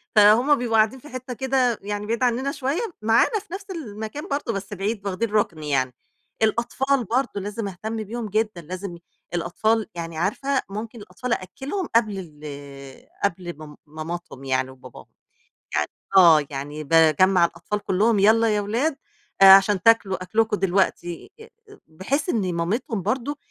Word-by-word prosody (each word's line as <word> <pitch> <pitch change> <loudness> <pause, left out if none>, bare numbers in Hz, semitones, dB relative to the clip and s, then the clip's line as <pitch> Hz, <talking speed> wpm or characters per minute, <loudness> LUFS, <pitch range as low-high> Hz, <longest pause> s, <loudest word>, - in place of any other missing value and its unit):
فهُم 220 +8 +6
بيبقوا 235 -2 -1
قاعدين 220 +5 +3
في 295 - -13
حتّة 255 0 -6
كده 255 -2 +1
يعني 205 +1 -4
بعيد 230 +3 -1
عننا 250 +3 +1
شوية، 280 - -2 0.2
معانا 225 - +3
في 385 -3 -14
نفْس 390 0 -6
المكان 220 - -6
برضه 280 -5 -2
بس 195 +1 -5
بعيد 200 +1 -3
واخدين 205 +3 -2
رُكن 170 -7 0
يعني، 130 -3 0 0.5
الأطفال 245 +4 +1
برضه 245 +3 0
لازم 205 +2 -4
اهتم 215 +4 -5
بيهم 225 +1 -5
جدًا 210 -3 -1
لازم 185 +2 -6
ي 170 - -15 0.3
الأطفال 215 +6 0
يعني 165 -1 -6
عارفة 265 - 0
ممكن 220 +3 -6
الأطفال 245 +4 -4
أأكّلهم 270 - -4
قبل 215 -4 +3 0.3
ال 140 -2 -10 0.2
قبل 175 -2 -1
م 155 -1 -11
ماماتهم 155 -2 -7
يعني 130 -1 0
وباباهم، 130 0 -13 0.7
يعني - - +1 0.3
آه 165 -5 +7
يعني 145 +2 -6
باجمّع 165 +4 +5
الأطفال 170 +5 -4
كلّهم 205 +2 +2
يالّا 225 +3 +5
يا 205 - +1
ولاد 255 +9 -1 0.4
آآ - - +10
عشان 195 0 +5
تاكلوا 200 -4 +3
أكلكم 215 +3 +1
دلوقتي، 180 -2 -1
ي 450 - -12 0.2
ب 410 - -14
بحيث 195 - -2
إن 195 - 0
مامتهم 200 +6 -2
برضه 255 - -2
210 Hz, 155 wpm, -23 LUFS, 175-240 Hz, 0.7 s, آآ